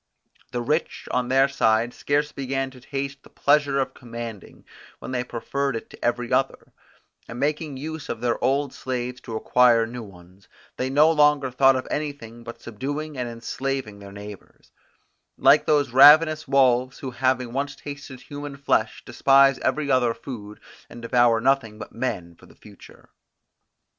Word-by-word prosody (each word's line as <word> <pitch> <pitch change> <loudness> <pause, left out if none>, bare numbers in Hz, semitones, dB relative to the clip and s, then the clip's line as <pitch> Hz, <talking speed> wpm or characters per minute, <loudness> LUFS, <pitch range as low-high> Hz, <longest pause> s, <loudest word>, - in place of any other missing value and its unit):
The 120 -1 -3
rich 150 +6 -2
on 125 -1 0
their 135 +2 +4
side 120 -3 +1
scarce 145 +1 -1
began 135 0 -3
to 130 -1 -15
taste 140 +1 -5
the - - -18
pleasure 145 -1 +2
of 135 - -2
commanding, 115 -4 -9 0.3
when - - -8
they 125 -1 -1
preferred 135 +2 -3
it 115 - -7
to - - -13
every 120 0 -1
other; - - -1 0.5
and 115 - -8
making 150 0 -2
use 155 +2 -7
of 115 - -4
their 120 0 -1
old 140 +1 +1
slaves 125 -1 -4
to 115 - -7
acquire 120 0 +4
new 120 +2 -7
ones, 95 -2 -15 0.3
they 130 - -2
no 150 +4 +5
longer 150 -3 +3
thought 135 +1 +4
of 130 - -3
anything 140 -6 -5
but 115 0 -9
subduing 145 +7 -5
and 125 -2 -3
enslaving 120 -1 -4
their 100 -1 -11
neighbours; 100 0 -12 0.7
like - - +5
those 145 -4 +2
ravenous 155 +4 +7
wolves, 130 -2 +2
who 130 - -6
having 125 -1 0
once 140 +1 -2
tasted 140 -3 -9
human 145 0 -8
flesh, 115 -6 0
despise 135 -1 +4
every 140 +2 -1
other 125 -3 +2
food, 105 -6 -9 0.3
and 120 0 -11
devour 120 -1 +3
nothing 125 -3 +1
but - - -9
men 100 -9 -4
for - - -19
the - - -19
future. - - -17
130 Hz, 165 wpm, -24 LUFS, 120-140 Hz, 0.7 s, ravenous